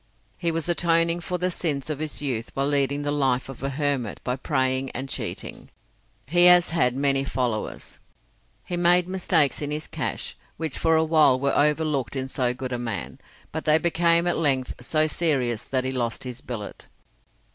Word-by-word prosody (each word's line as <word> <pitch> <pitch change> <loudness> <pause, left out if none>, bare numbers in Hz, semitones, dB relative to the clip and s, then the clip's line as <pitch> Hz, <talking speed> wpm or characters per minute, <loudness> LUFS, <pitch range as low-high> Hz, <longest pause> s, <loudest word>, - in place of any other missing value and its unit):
He 170 -1 0
was 165 0 -2
atoning 170 0 +2
for 180 +1 -3
the 180 +1 -1
sins 150 -6 -2
of 145 - -4
his 155 -1 -4
youth 125 -4 -3
by 135 - 0
leading 140 0 +1
the 145 - -1
life 135 -3 0
of 135 - -9
a 135 - -2
hermit 140 -5 -1
by 125 - -1
praying 130 -1 -1
and 130 +2 -3
cheating. - - -6 0.6
He 175 +5 +5
has 180 -1 +7
had 125 -7 +1
many 135 0 +2
followers. 125 -5 -3 0.7
He 175 - -3
made 175 +1 +3
mistakes 175 -7 +2
in 145 - -3
his 150 +1 -3
cash, - - -4 0.2
which 160 -3 -3
for 160 0 +2
a 160 - +3
while 155 -5 +4
were 140 +1 0
overlooked 150 -5 +1
in 130 0 -3
so 125 -2 0
good 130 0 -5
a 120 - -2
man, 115 -6 -5 0.3
but 160 - -5
they 155 0 +5
became 170 0 +2
at 175 - 0
length 135 -5 +2
so 155 +4 +2
serious 135 -8 0
that 130 -1 -1
he 130 - -1
lost 120 -3 -2
his 125 -1 -7
billet. 110 -5 -7
145 Hz, 185 wpm, -24 LUFS, 130-165 Hz, 0.7 s, has